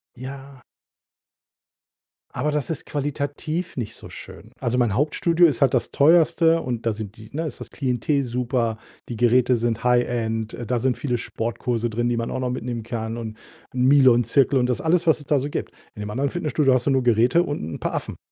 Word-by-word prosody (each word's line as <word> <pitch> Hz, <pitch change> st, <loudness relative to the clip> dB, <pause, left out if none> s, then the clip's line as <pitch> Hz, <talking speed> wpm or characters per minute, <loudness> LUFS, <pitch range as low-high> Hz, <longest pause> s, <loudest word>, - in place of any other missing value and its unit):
Ja. 135 Hz, +1 st, -9 dB, 1.7 s
Aber 150 Hz, +4 st, -1 dB
das 145 Hz, -4 st, -2 dB
ist 160 Hz, -, -4 dB
qualitativ 145 Hz, +4 st, -3 dB
nicht 115 Hz, -5 st, -4 dB
so -, -, -11 dB
schön. 110 Hz, +3 st, -11 dB
Also, 125 Hz, -1 st, -1 dB
mein 120 Hz, -5 st, +2 dB
Hauptstudio 165 Hz, +6 st, +3 dB
ist 145 Hz, -7 st, -2 dB
halt 135 Hz, -2 st, +4 dB
das 120 Hz, -2 st, 0 dB
teuerste 165 Hz, +2 st, +4 dB
und 120 Hz, -2 st, -4 dB
da 115 Hz, -, +2 dB
sind 105 Hz, 0 st, -7 dB
die 110 Hz, 0 st, -12 dB
ne, 160 Hz, +2 st, -2 dB
ist -, -, -8 dB
das -, -, -8 dB
Klientel 135 Hz, +1 st, 0 dB
super. 120 Hz, -2 st, -1 dB, 0.3 s
Die 120 Hz, -, -4 dB
Geräte 125 Hz, +2 st, +3 dB
sind 115 Hz, -1 st, -1 dB
High 125 Hz, 0 st, +4 dB
End. 115 Hz, -2 st, -2 dB
Äh, 120 Hz, -, -6 dB
da 120 Hz, +1 st, 0 dB
sind 130 Hz, 0 st, 0 dB
viele 125 Hz, -4 st, -1 dB
Sportkurse 115 Hz, +1 st, -2 dB
drin, 120 Hz, +2 st, -1 dB
die 120 Hz, -, 0 dB
man 115 Hz, -, -2 dB
auch -, -, -3 dB
noch 125 Hz, -1 st, -1 dB
mitnehmen 120 Hz, -2 st, -4 dB
kann 115 Hz, 0 st, -4 dB
und 110 Hz, -2 st, -6 dB, 0.4 s
’n 125 Hz, -, -1 dB
Milon-Zirkel 130 Hz, 0 st, +5 dB
und 125 Hz, -, +2 dB
das 125 Hz, -, -1 dB
alles, 170 Hz, +1 st, +1 dB
was 160 Hz, -, +4 dB
es 145 Hz, -, -11 dB
da 145 Hz, +1 st, +2 dB
so 140 Hz, +3 st, -3 dB
gibt. -, -, -4 dB, 0.2 s
In 105 Hz, -, -7 dB
dem 105 Hz, -, -5 dB
anderen 135 Hz, +5 st, -1 dB
Fitnessstudio 150 Hz, -5 st, +1 dB
hast 125 Hz, -1 st, +1 dB
du -, -, +2 dB
nur 130 Hz, -1 st, +2 dB
Geräte 120 Hz, +8 st, +4 dB
und 145 Hz, -4 st, -4 dB
'n 80 Hz, +1 st, -6 dB
paar -, -, -2 dB
Affen. -, -, -4 dB
125 Hz, 210 wpm, -23 LUFS, 115-145 Hz, 1.7 s, Milon-Zirkel